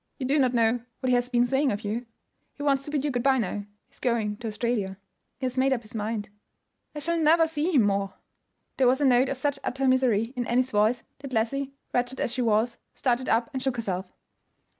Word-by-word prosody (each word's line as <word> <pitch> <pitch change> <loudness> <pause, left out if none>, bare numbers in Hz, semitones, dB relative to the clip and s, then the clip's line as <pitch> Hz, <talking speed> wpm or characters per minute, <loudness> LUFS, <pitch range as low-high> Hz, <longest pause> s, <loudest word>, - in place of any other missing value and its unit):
You 265 - -3
do 285 +3 +2
not 255 -2 +2
know 230 +1 +3 0.2
what 260 - -1
he - - +4
has 245 0 0
been 245 -1 +3
saying 270 +2 +2
of 205 0 -3
you. 225 +4 -3 0.5
He 290 - -7
wants 275 -2 +2
to - - -6
bid 295 -1 -1
you 290 - 0
good 245 -1 -1
by 270 +1 +4
now. 205 -3 -2 0.2
He - - -44
is - - -17
going 220 -4 0
to 235 - -6
Australia; 210 -3 -2 0.4
he 265 - -4
has 255 0 -1
made 270 +1 +3
up 245 -3 0
his 215 - -13
mind. 215 -1 -3 0.7
I - - -5
shall 335 +3 -1
never 325 +1 +5
see 320 +2 -1
him 250 - +6
more." 195 -1 0 0.6
There 260 - +4
was 260 +2 +3
a 290 - +2
note 255 0 +4
of 275 - -2
such 280 +1 -1
utter 270 +1 -1
misery 250 -3 +2
in 245 -1 -2
Annie's 255 +2 +1
voice 215 +3 +2 0.2
that 275 -2 -8
Leslie, 270 +5 -1 0.2
wretched 245 +1 0
as 240 - -1
she 250 - -1
was, 230 +1 +1 0.2
started 255 0 0
up 235 +5 +2
and 260 - -2
shook 260 -1 0
herself. 190 -5 -3
250 Hz, 235 wpm, -27 LUFS, 225-270 Hz, 0.7 s, him